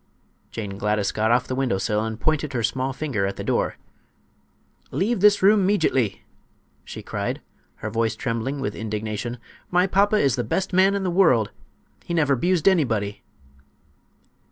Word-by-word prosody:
Jane 100 -3 -6
Gladys 105 -1 0
got 110 +1 0
off 125 +2 +3
the 130 - -4
window 130 -6 0
sill 105 +2 0
and 110 0 -4
pointed 150 0 0
her 120 -2 -1
small 130 +3 -1
finger 130 -9 -2
at 100 - -4
the - - -6
door. - - 0 1.1
"Leave 215 +4 0
this 205 0 +4
room 205 0 +5
'meejitly!" 155 - +1 0.6
she - - -9
cried, - - -3 0.5
her - - -1
voice 115 0 0
trembling 125 +3 -3
with 135 - -2
indignation. 110 +2 -4 0.3
"My 180 +1 +3
papa 200 +2 +2
is 140 - +2
the 120 - 0
best 190 - -2
man 190 +2 +4
in 200 - -1
the 185 - 0
world. 145 - +3 0.5
He 170 - -3
never 145 -4 +3
'bused 175 +5 +1
anybody!" 115 - +1
130 Hz, 160 wpm, -23 LUFS, 110-180 Hz, 1.1 s, room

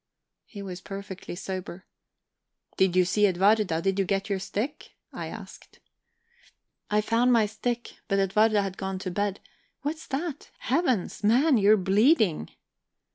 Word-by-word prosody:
He 200 -3 -9
was 185 -2 -7
perfectly 195 -3 -7
sober. 185 -1 -6 0.9
"Did 190 -2 +2
you 185 -1 +5
see 210 +3 +3
Edwarda? 190 -2 +2
Did 195 0 0
you 195 - +2
get 195 +2 -1
your 195 - 0
stick?" 215 +9 -4 0.2
I - - -5
asked. - - -11 1.1
"I 210 0 +2
found 235 +3 +2
my 230 -3 +4
stick. 235 +3 -4
But 195 - +1
Edwarda 205 +2 +3
had 190 -1 -5
gone 190 -1 -3
to 185 -1 -5
bed... 200 +1 -2 0.4
What's 310 +2 -4
that? 295 +1 -4
Heavens, 330 - 0
man, 250 +5 +4
you're 210 +2 +5
bleeding!" 195 - +3
200 Hz, 140 wpm, -27 LUFS, 190-230 Hz, 1.1 s, you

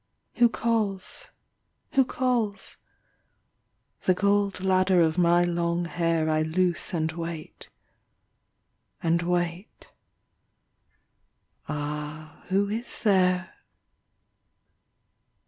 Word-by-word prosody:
Who 240 -1 +6
calls? 215 -5 -1 0.6
Who 270 - +4
calls? 245 -6 -1 1.3
The 185 - +4
gold 200 -1 +1
Ladder 185 -1 +3
of 165 +1 +2
my 175 0 +4
long 170 0 0
hair 165 -2 0
I 155 0 +2
loose 175 +3 0
and 160 -2 -1
wait.... 165 -1 -7 1.3
and 170 +1 +2
wait.... 175 +2 -3 1.8
Ah, 150 +1 -5
who 195 +2 +2
is 225 +4 -3
there? 185 -3 +2
175 Hz, 80 wpm, -26 LUFS, 165-200 Hz, 1.8 s, Who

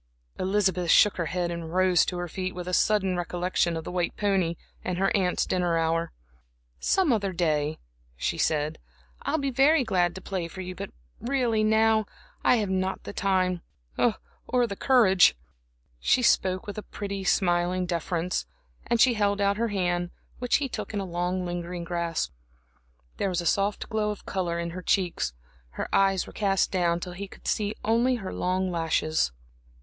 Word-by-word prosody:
Elizabeth 190 -3 +1
shook 210 - +6
her 170 -3 -1
head 175 0 -1
and 170 0 -5
rose 185 -2 +4
to 180 - -3
her 175 0 -3
feet, 185 +2 -4
with 180 -1 -6
a 180 - -3
sudden 195 -2 +2
recollection 175 -1 0
of 160 - -5
the - - -6
white 180 -1 -1
pony 190 -5 +1 0.3
and 180 - -2
her 195 +1 +2
aunt's 185 -3 +1
dinner 175 -2 +1
hour. 165 +1 0 0.7
"Some 370 -9 +2
other 200 -3 0
day," 155 -4 0 0.4
she - - -1
said, 150 -1 0 0.4
"I'll - - 0
be 275 -2 -1
very 275 +3 +4
glad 180 -6 +1
to - - -6
play 185 -3 -3
for 185 +3 -8
you, 185 0 -5
but - - -6 0.3
really 240 -4 +1
now 220 0 +3 0.4
I - - +5
have 210 -4 0
not 190 0 -1
the - - -7
time 185 -3 +1 0.3
or 245 - 0
the 200 -4 -5
courage." 195 - +5 0.6
She 250 - +2
spoke 185 -4 +2
with 205 +1 -5
a - - -12
pretty, 200 -1 -4
smiling 180 -1 +2
deference, 175 0 -2 0.4
and 235 - +1
she 250 +1 +6
held 205 -2 +1
out 200 0 +2
her 230 +1 +1
hand, 175 -4 -1 0.3
which 245 -1 +1
he 285 - +1
took 235 - -5
in - - 0
a 195 - -3
long, 180 +1 -2
lingering 175 0 -4
grasp. 170 - -2 0.9
There 200 - 0
was 180 -1 -1
a 175 - -3
soft 200 +4 +1
glow 215 -2 0
of 210 - -6
color 175 -3 -2
in 170 0 -3
her 185 +2 -6
cheeks, 175 - 0 0.4
her - - -2
eyes 195 -1 +3
were - - -12
cast 195 -2 +1
down 175 -2 +1
till 180 0 -6
he 200 +3 -6
could - - -13
see 210 0 0
only 235 +4 +3
her 195 -6 -5
long 185 +1 0
lashes. 160 - +1
185 Hz, 180 wpm, -27 LUFS, 175-205 Hz, 0.9 s, shook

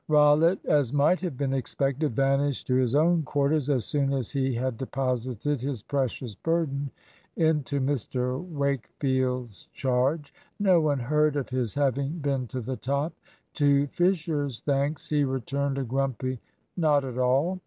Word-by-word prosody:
Rollitt, 150 +4 +4
as 145 -5 +2
might 145 +6 +3
have 170 -8 -4
been 135 -1 -1
expected, 135 0 -1
vanished 135 +1 +1
to 125 - 0
his 130 0 +2
own 165 +3 +4
quarters 145 0 0
as 130 -5 +1
soon 140 -2 0
as 130 -5 -1
he 135 -2 0
had 125 -1 -2
deposited 130 0 -2
his 130 -5 -3
precious 130 -4 -2
burden 145 - -1 0.5
into 150 -4 +1
Mr 130 0 -1
Wakefield's 130 - -2
charge. 135 +4 -1 0.3
No 185 -4 +4
one 150 -2 +1
heard 150 +3 +2
of 140 -3 -2
his 125 -4 -2
having 140 0 0
been 140 -5 -1
to 130 +1 -5
the 130 +3 -4
top. 140 +5 -1 0.4
To 145 -1 +3
Fisher's 160 -8 0
thanks 140 +1 -1
he 150 -1 +2
returned 135 +1 -1
a 135 - -1
grumpy 130 0 -2 0.4
"Not 150 -5 +2
at 130 -1 -5
all." 135 +9 +2
140 Hz, 150 wpm, -27 LUFS, 130-150 Hz, 0.5 s, Rollitt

